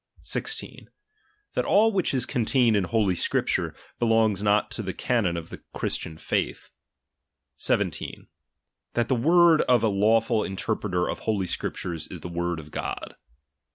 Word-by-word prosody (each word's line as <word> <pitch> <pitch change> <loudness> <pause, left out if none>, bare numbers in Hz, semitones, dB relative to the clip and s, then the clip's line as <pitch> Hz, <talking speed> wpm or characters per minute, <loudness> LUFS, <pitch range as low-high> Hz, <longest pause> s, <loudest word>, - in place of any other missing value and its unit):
16. 440 +1 -4 0.6
That - - 0
all 220 +3 +4
which 190 -4 +1
is 130 -3 0
contained 120 -2 +2
in 100 -3 +2
Holy 105 -1 +1
Scripture, 85 - 0 0.2
belongs 115 -4 +2
not 105 +1 +2
to 120 - -4
the 95 -3 -4
canon 105 -8 0
of 85 0 -7 0.2
Christian 80 -1 -3
faith. - - -2 0.9
17. - - -1 0.7
That 120 -1 +1
the 130 - +3
word 165 +5 +5
of 125 -2 +4
a 110 - +4
lawful 110 +2 +2
interpreter 95 -2 -1
of - - -3
Holy 105 -4 -1
Scriptures, 85 -2 -3
is - - -9
the 90 - -6
word 85 0 -2
of 75 -1 -12
GoU. - - -5
110 Hz, 145 wpm, -26 LUFS, 90-120 Hz, 0.9 s, word